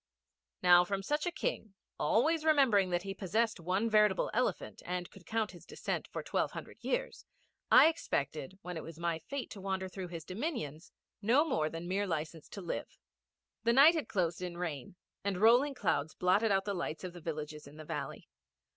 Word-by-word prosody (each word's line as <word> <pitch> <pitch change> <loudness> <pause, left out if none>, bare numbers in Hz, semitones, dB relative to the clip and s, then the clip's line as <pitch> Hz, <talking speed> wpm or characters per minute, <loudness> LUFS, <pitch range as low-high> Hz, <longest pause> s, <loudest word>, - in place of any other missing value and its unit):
Now, 175 0 +8
from 195 +2 -3
such 295 - -1
a - - 0
King, 220 - -3 0.2
always 310 +7 +2
remembering 265 -12 +4
that 175 0 0
he 195 0 -4
possessed 215 +3 0
one 185 +6 0
veritable 210 -3 +3
elephant, 250 +3 -1
and 180 0 -3
could 180 -4 -16
count 220 -1 0
his 175 - -13
descent - - -4
for - - -5
twelve - - -1
hundred - - -9
years, - - -2 0.5
I - - +9
expected, 155 - -2
when 180 -1 -5
it 160 - -5
was 165 -1 -9
my 170 -1 -1
fate 275 - -6
to 200 - -8
wander 190 -1 -2
through 185 -1 -6
his 170 -2 -7
dominions, 185 - -4 0.3
no 245 +9 +4
more 155 - 0
than 165 +2 -6
mere 200 +2 0
license 160 -1 -4
to 200 - -7
live. 175 - -5 0.7
The 235 - +3
night 285 +6 +8
had 315 -4 -3
closed 175 -3 0
in 175 -1 -5
rain, 165 -4 -4 0.3
and 200 -2 -1
rolling 245 +6 +5
clouds 155 - 0
blotted 205 +5 +3
out 195 -1 +2
the 200 - -1
lights 170 -3 -4
of 180 -1 -5
the 175 - -10
villages 150 -2 -5
in 145 +2 -13
the 155 - -9
valley. - - -5
190 Hz, 190 wpm, -33 LUFS, 170-230 Hz, 0.7 s, I